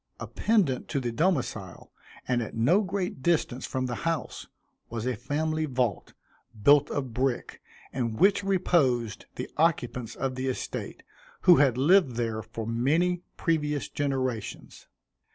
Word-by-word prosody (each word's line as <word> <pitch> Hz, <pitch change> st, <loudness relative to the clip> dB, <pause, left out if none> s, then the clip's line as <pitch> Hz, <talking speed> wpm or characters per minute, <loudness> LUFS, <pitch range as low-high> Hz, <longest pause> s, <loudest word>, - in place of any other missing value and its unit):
Appendant 195 Hz, -, 0 dB
to 140 Hz, -, -1 dB
the 120 Hz, -2 st, -2 dB
domicile, 120 Hz, -, -2 dB, 0.4 s
and 125 Hz, -1 st, +1 dB
at 115 Hz, -, -6 dB
no 145 Hz, -, +4 dB
great 185 Hz, -6 st, -3 dB
distance 135 Hz, -5 st, 0 dB
from 130 Hz, 0 st, -2 dB
the 125 Hz, -, -3 dB
house, 165 Hz, -2 st, -3 dB, 0.4 s
was 115 Hz, 0 st, -4 dB
a 125 Hz, -1 st, 0 dB
family 155 Hz, +6 st, -1 dB
vault, 125 Hz, -7 st, -2 dB, 0.5 s
built 145 Hz, +3 st, +6 dB
of 130 Hz, -5 st, -3 dB
brick, 130 Hz, +1 st, -2 dB, 0.3 s
in 115 Hz, -4 st, -2 dB
which 195 Hz, -, +4 dB
reposed 145 Hz, -, +1 dB
the -, -, -4 dB
occupants 125 Hz, -7 st, 0 dB
of 135 Hz, -1 st, -2 dB
the 130 Hz, +1 st, -3 dB
estate, 130 Hz, -, -4 dB, 0.4 s
who 175 Hz, -2 st, +7 dB
had 135 Hz, -4 st, +4 dB
lived 145 Hz, -2 st, +4 dB
there 115 Hz, -2 st, -2 dB
for 110 Hz, +1 st, -7 dB
many 155 Hz, +10 st, +1 dB, 0.2 s
previous 150 Hz, -3 st, 0 dB
generations. 130 Hz, -6 st, -3 dB
135 Hz, 135 wpm, -27 LUFS, 120-160 Hz, 0.5 s, who